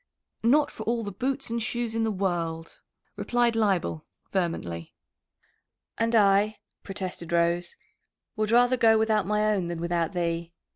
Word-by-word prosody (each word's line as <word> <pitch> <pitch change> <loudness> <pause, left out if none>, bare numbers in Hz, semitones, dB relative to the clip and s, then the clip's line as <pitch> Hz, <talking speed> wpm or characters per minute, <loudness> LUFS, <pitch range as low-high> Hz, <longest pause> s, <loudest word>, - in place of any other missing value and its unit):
"Not 285 +6 +3
for - - -10
all 230 0 0
the 205 - -5
boots 265 +5 -3
and 235 0 -1
shoes 235 0 -2
in 225 0 0
the 225 - +1
world," 170 -4 -3 0.3
replied 240 -1 +1
Leibel 195 -7 0 0.3
vehemently. 125 - -3 1.0
"And 230 +1 0
I," 205 0 +4 0.2
protested 185 -3 -6
Rose, 170 +1 +1 0.6
"would 215 0 -1
rather 245 +2 +4
go 225 -2 +5
without 220 -3 +1
my 210 +1 +2
own 185 -4 -1
than 170 -1 -4
without 170 0 -1
thee." 170 -1 -2
205 Hz, 145 wpm, -27 LUFS, 170-230 Hz, 1.0 s, go